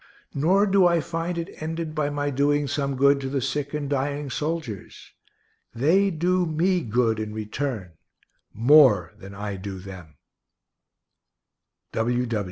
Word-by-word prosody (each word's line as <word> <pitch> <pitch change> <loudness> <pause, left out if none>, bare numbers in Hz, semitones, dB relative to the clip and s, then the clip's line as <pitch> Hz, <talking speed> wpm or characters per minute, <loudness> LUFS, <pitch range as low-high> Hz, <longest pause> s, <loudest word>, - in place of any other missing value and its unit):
Nor 180 +8 +3
do 195 -2 +4
I 170 -1 +3
find 165 +2 -3
it 165 -2 -6
ended 160 0 -4
by 150 -2 -1
my 145 0 -2
doing 145 +1 +1
some 140 0 -2
good 140 +1 +4
to 135 - -3
the 140 0 -1
sick 140 +2 -2
and 150 -2 -3
dying 140 0 -2
soldiers. 150 - -5 0.6
They 175 +11 +3
do 180 +1 +1
me 175 +3 +1
good 115 -2 +1
in 110 0 -5
return, 110 -3 -4 0.6
more 120 - +5
than 100 0 -11
I 105 -1 -5
do 95 0 -6
them. 90 -5 -11
145 Hz, 135 wpm, -24 LUFS, 115-160 Hz, 0.6 s, more